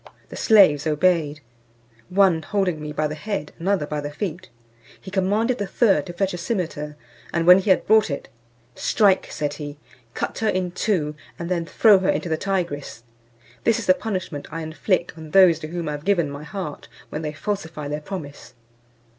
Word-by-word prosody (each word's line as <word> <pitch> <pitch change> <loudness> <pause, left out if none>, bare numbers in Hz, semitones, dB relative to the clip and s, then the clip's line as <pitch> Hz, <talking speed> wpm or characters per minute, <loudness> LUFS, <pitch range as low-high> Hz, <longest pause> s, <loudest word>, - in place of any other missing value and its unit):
The - - -9
slaves 180 - +5
obeyed, 155 -2 +1 0.7
one 185 -3 +4
holding 180 -3 -1
me 150 0 -5
by 155 +1 -1
the 150 - -2
head, 195 -1 -4
another 190 -2 +1
by 150 0 -3
the 145 - -4
feet; 175 +3 -5 0.5
he 190 - -10
commanded 205 +6 +1
the 205 - -2
third 195 - +2
to 175 - -6
fetch 190 +2 -1
a 175 - -5
cimeter, 165 -7 -3 0.4
and 165 0 0
when 180 +2 +9
he 195 - -3
had 185 - +4
brought 220 -2 +4
it, 140 - -4 0.5
"Strike," 200 - +2
said 145 -1 -2
he, 145 -1 -7 0.4
"cut - - -3
her 220 - +1
in 185 -1 -1
two, 175 -6 0 0.2
and 170 0 -5
then 170 -2 -1
throw 210 0 +5
her 185 - 0
into 175 - 0
the 160 - +1
Tygris. 170 - -3 0.6
This 230 - +3
is 230 - -4
the 185 - +6
punishment 185 -8 -4
I 165 0 -4
inflict 160 +4 -1
on 160 -1 -9
those 180 -2 +6
to 155 - -6
whom 170 0 -4
I - - -1
have 145 0 -5
given 175 -6 +1
my 140 +1 -8
heart, 180 -4 -6 0.2
when 150 - -4
they 155 -1 -3
falsify 160 -3 -4
their 150 +1 -3
promise." 150 -8 -8
175 Hz, 190 wpm, -23 LUFS, 150-195 Hz, 0.7 s, when